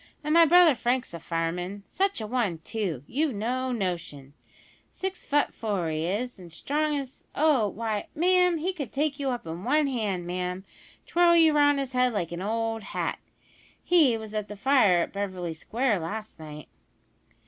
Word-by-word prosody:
An' 300 +1 0
my 335 0 +7
brother 345 -1 +7
Frank's 245 -2 -1
a 170 - -6
fireman. 175 +4 -3
Such 390 -3 0
a - - -3
one, 215 -7 -1
too, 185 - -3
you've 285 - -1
no 255 +5 -2
notion; 170 - -4 0.6
six 380 -1 -5
fut 290 0 +1
four 200 -7 -2
he 155 +1 -2
is, 220 +4 -3
an' 180 - -11
as 165 - -13
strong 300 - -1
as 270 -2 -8
oh, 285 -8 +3
why, 215 0 -3
ma'am, 360 +1 +3
he 355 +5 -2
could 285 -10 -6
take 290 0 -1
you 275 -1 -1
up 245 -6 -3
in 165 +3 -6
one 300 +5 +3
hand, 210 -9 -2
ma'am, 180 +1 -4
an' - - -25
twirl 345 0 +4
you 325 -2 +6
round 290 -1 +4
his 270 -2 -3
head 250 -1 +2
like 175 -6 -2
an 170 +1 -5
old 225 +2 -2
hat! - - -3 0.6
He 305 -10 +4
was 220 -1 -9
at 210 -1 -3
the 210 0 -9
fire 200 -8 +4
in - - -7
Beverly 185 -4 -4
Square 225 +6 -1
last 210 +4 -6
night." 150 -2 -9
225 Hz, 185 wpm, -27 LUFS, 180-290 Hz, 0.6 s, my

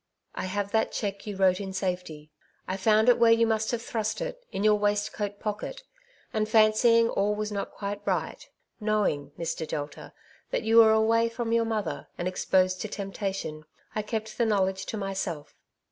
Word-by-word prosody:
'^I - - -3
have 200 +2 -2
that 220 -1 +1
cheque 200 -1 -4
you 205 - -4
wrote 185 -1 +3
in 190 -1 -5
safety. 180 -5 -4 0.4
I 185 - -2
found 215 +3 +3
it 245 - +6
where 230 -1 +6
you 230 0 +5
must 220 -1 0
have 235 -1 -2
thrust 220 -2 -2
it, - - -5
in 195 - -3
your 215 0 +6
waistcoat 205 0 -1
pocket; 210 -1 -4 0.5
and 215 -1 0
fancying 230 +1 +5
all 210 -1 0
was 210 0 -3
not 200 -1 -3
quite 205 0 -5
right - - -2 0.2
— - - -50
knowing, 150 -10 0
Mr. 165 -1 -3
Delta, 145 -1 -5 0.4
that - - -1
you 225 +1 +3
were 225 -1 +8
away 225 +1 +3
from 230 0 -3
your 230 0 +3
mother, 215 -6 -3
and 175 - -2
exposed 185 0 +1
to - - -3
temptation, 195 -6 -4 0.3
I 215 - -1
kept 220 +1 -5
the 235 - +4
knowledge 190 -2 0
to 220 - -3
myself. 190 -6 -4
210 Hz, 185 wpm, -27 LUFS, 190-220 Hz, 0.5 s, were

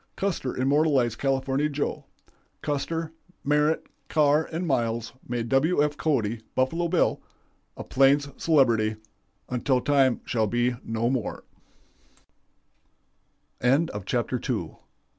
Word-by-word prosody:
Custer 180 -9 -2
immortalized 135 -3 +2
California 135 +2 0
Joe. 145 0 -3 0.6
Custer, 160 +3 -2 0.3
Merritt, 150 +2 +2 0.2
Carr, 150 0 +3
and 165 +3 -2
Miles 115 -6 -1
made 120 -1 -3
William 155 +6 +3
F. 150 0 -1
Cody 115 -9 0
('Buffalo 165 +7 +1
Bill') 170 0 +1 0.6
a - - -5
plains 140 +2 +3
celebrity 115 -9 +3 0.5
'until 125 +1 +1
time 135 -2 +2
shall 110 -3 0
be 120 +3 +1
no 115 +1 -1
more'." 125 -5 -3 2.6
CHAPTER - - -1
III. - - -3
135 Hz, 105 wpm, -26 LUFS, 120-150 Hz, 2.6 s, Carr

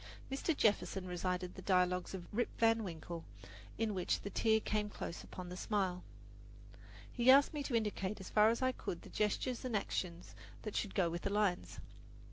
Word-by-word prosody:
Mr. 280 +3 0
Jefferson 200 -3 +2
recited 180 0 -2
the 190 - -9
best - - -17
dialogues 180 0 +2
of 180 -2 -7
"Rip 240 +3 +1
Van 225 0 +4
Winkle," 170 -2 -6 0.5
in 225 -1 0
which 185 -2 0
the 200 - -5
tear 220 +1 +3
came 210 -1 -1
close 170 - -6
upon 180 -1 -8
the 180 - -6
smile. 185 -2 -1 1.1
He 240 0 +2
asked 280 +3 +7
me 295 - -2
to 265 -3 -2
indicate 210 -2 -1
as 190 - -8
far 215 0 +6
as 230 +3 0
I 255 - +3
could 175 -8 -5
the - - -11
gestures 215 +4 0
and 245 -4 0
action 175 -3 -3 0.4
that 215 - -5
should 205 - -2
go 185 -3 +3
with 170 +1 -3
the - - -1
lines. 200 -3 0
200 Hz, 190 wpm, -36 LUFS, 180-225 Hz, 1.1 s, asked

